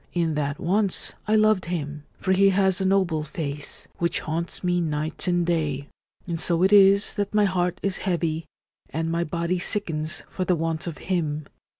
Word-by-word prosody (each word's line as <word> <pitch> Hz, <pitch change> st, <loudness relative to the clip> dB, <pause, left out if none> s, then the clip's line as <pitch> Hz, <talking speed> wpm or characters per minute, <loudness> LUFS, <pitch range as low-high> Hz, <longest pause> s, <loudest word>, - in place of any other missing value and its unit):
In 170 Hz, -2 st, +1 dB
that 145 Hz, -1 st, -1 dB
once 195 Hz, +2 st, +1 dB
I 215 Hz, -, +3 dB
loved 215 Hz, -3 st, +4 dB
him, 150 Hz, -4 st, -4 dB
for 190 Hz, -, -1 dB
he 195 Hz, +1 st, +5 dB
has 190 Hz, -1 st, +2 dB
a -, -, +1 dB
noble 185 Hz, -5 st, +2 dB
face, 150 Hz, -1 st, -4 dB
which 170 Hz, 0 st, 0 dB
haunts 165 Hz, +4 st, -3 dB
me 175 Hz, -1 st, +1 dB
night 155 Hz, +1 st, -2 dB
and 175 Hz, -1 st, +2 dB
day; 150 Hz, -5 st, -1 dB, 0.4 s
and 170 Hz, -2 st, -3 dB
so 170 Hz, +1 st, +1 dB
it 190 Hz, +2 st, +4 dB
is 200 Hz, 0 st, +6 dB
that 205 Hz, 0 st, -2 dB
my 210 Hz, -1 st, +5 dB
heart 180 Hz, -2 st, 0 dB
is 195 Hz, -1 st, +1 dB
heavy, 165 Hz, -4 st, -1 dB, 0.4 s
and 165 Hz, +1 st, -2 dB
my 170 Hz, +1 st, +1 dB
body 170 Hz, +2 st, -1 dB
sickens 160 Hz, -6 st, -1 dB
for 185 Hz, -, -3 dB
the 180 Hz, -1 st, +2 dB
want 165 Hz, 0 st, -2 dB
of 165 Hz, -, -5 dB
him. 155 Hz, -5 st, -2 dB
170 Hz, 185 wpm, -25 LUFS, 155-190 Hz, 0.4 s, is